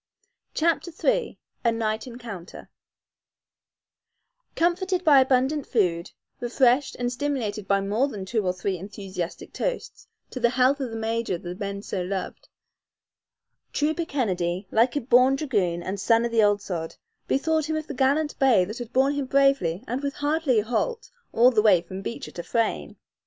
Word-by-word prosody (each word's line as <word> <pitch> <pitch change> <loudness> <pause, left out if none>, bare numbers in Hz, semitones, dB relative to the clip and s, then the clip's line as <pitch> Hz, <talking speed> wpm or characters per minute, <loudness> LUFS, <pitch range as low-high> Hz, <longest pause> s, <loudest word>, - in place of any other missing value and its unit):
CHAPTER 335 +2 +1
III - - +1 0.3
A 235 - +3
NIGHT 220 0 -2
ENCOUNTER 230 -8 -9 1.8
Comforted 360 +2 +1
by 285 -5 +7
abundant 265 +3 +1
food, 175 -7 0 0.3
refreshed 250 +2 +2
and 245 0 -2
stimulated 245 -7 -3
by 200 0 +2
more 210 +7 +1
than 205 -8 -6
two 220 +2 -1
or 180 - +1
three 185 0 -3
enthusiastic 190 -2 -6
toasts - - -4 0.2
to 255 - -5
the 240 -1 +3
health 260 +3 +3
of 265 -3 -3
the 225 - -7
major 225 -3 -1
the 175 +1 -7
men 200 +1 -5
so 190 - -3
loved, 190 +1 -5 1.2
Trooper 315 +3 0
Kennedy, 185 - -2
like 235 +4 +3
a 290 - 0
born 255 +2 +4
dragoon 200 - -1
and 195 +2 -4
son 230 +3 +3
of 235 - -2
the 230 -1 +3
ould 205 -1 +3
sod, 165 -3 -4 0.3
bethought 315 +2 0
him 315 - 0
of 310 -1 -3
the 295 - -6
gallant 285 +4 +1
bay 250 -10 +4
that 215 +7 -7
had 240 -1 -7
borne 270 +3 +3
him 285 -2 -2
bravely 275 -10 +2
and 250 +4 -2
with 280 0 -3
hardly 290 -4 +1
a - - -9
halt 350 - -2 0.2
all 245 +3 +5
the 235 - -11
long 215 - +4
way 185 -5 +6
from 190 +2 -7
Beecher 235 - -6
to 175 - -6
Frayne. 230 +4 -1
235 Hz, 170 wpm, -25 LUFS, 200-275 Hz, 1.8 s, by